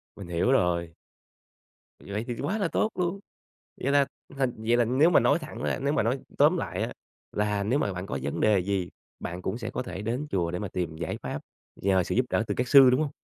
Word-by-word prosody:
Mình 100 -3 -9
hiểu 85 +9 +1
rồi. 85 -6 +1 1.0
Vậy 105 +3 -4
thì 120 - -3
quá 210 +5 -1
là 195 -5 +1
tốt 215 - 0
luôn. 180 +2 -1 0.6
Vậy 140 +2 +1
là 140 -1 +5 0.3
thành 130 -3 +1
vậy 115 +2 +2
là 120 - +4
nếu 135 +9 +4
mà - - +6
nói - - +3
thẳng 155 -1 -8
ra, - - 0
nếu 140 +1 +1
mà - - +2
nói 120 +5 0 0.2
tóm - - +5
lại - - -2
á, - - -2 0.4
là 105 -1 0
nếu 125 +8 +1
mà 100 - 0
bạn 90 +2 -5
có 70 - -3
vấn - - -3
đề 105 -2 +4
gì, 95 -2 -1 0.3
bạn 90 +1 -5
cũng 100 +5 -2
sẽ 115 -1 -4
có - - -3
thể 100 -5 -6
đến 125 +7 -2
chùa 85 -3 0
để 90 - -3
mà 105 0 -4
tìm 85 -3 -3
giải 80 0 -3
pháp, - - -4 0.4
nhờ 95 -2 +2
sự - - -2
giúp 125 0 +2
đỡ - - +2
từ - - -1
các 125 0 -1
sư, 135 -3 +9
đúng 125 - +2
hông? 150 -2 0
110 Hz, 245 wpm, -27 LUFS, 95-135 Hz, 1.0 s, sư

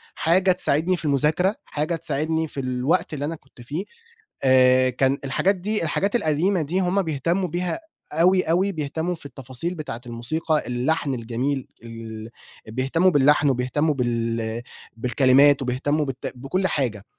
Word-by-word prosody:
حاجة 185 +3 +3
تساعدني 180 0 +1
في 165 - -6
المذاكرة، 150 +8 +2
حاجة 155 +3 -2
تساعدني 160 0 -1
في 145 - -7
الوقت 130 +7 0
اللي 145 -1 -3
أنا 165 +3 -3
كنت 135 -4 -18
فيه 145 +9 -4 0.6
آآ، 130 0 +5
كان 135 +2 +1
الحاجات 180 +9 +1
دي 210 +3 -2
الحاجات 195 +7 0
القديمة 170 0 +1
دي 170 +6 -1
هم 190 +2 +1
بيهتموا 170 +4 -1
بيها 175 - -2 0.3
أوي، 180 +4 +4
أوي، 185 +5 +1
بيهتموا 160 +2 -2
في 160 - -10
التفاصيل 135 +5 -4
بتاعة 150 -8 -6
الموسيقى 150 +7 -1
اللحن 135 +3 0
الجميل 125 +3 -2
ال 115 -1 -8 0.4
بيهتموا 135 +10 +2
باللحن 145 -1 +4
وبيهتموا 135 +5 0
بال 115 -2 -2 0.3
بالكلمات 135 +3 +4
وبيهتموا 145 +4 0
بت 135 -2 -5
بكُل 160 +10 -1
حاجة، 120 - -1
145 Hz, 145 wpm, -23 LUFS, 130-170 Hz, 0.6 s, آآ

